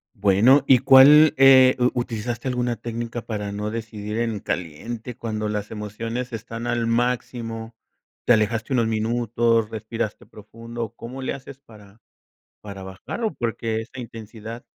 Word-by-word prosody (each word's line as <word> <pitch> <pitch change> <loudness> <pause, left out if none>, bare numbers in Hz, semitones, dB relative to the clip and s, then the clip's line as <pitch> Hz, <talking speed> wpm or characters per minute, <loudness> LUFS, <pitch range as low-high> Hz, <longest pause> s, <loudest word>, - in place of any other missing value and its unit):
Bueno, 105 +7 +4
¿y 130 -2 +6
cuál, 140 +3 +8
eh 130 -1 +7
u 125 0 +3
utilizaste 120 0 -3
alguna 125 -1 -1
técnica 115 0 -5
para 105 -2 -4
no 105 +1 -3
decidir 110 -1 -5
en 115 -3 -1
caliente 110 +9 -5
cuando 110 -3 -3
las 105 -1 -3
emociones 115 +4 -5
están 115 +1 -6
al 120 -1 0
máximo? 115 -1 -2 0.5
¿Te - - +6
alejaste 110 +3 0
unos 120 -3 +2
minutos, 115 0 +1
respiraste 110 -1 -5
profundo? 115 +2 -8
¿O 115 - -10
cómo 125 +3 -8
le - - -2
haces 135 0 -10
para 105 -4 -17 0.6
para 100 -2 -8
bajarlo? 145 - -5
Porque 115 -1 -2
esa 125 +3 -13
intensidad 115 0 -9
115 Hz, 140 wpm, -23 LUFS, 110-120 Hz, 0.6 s, cuál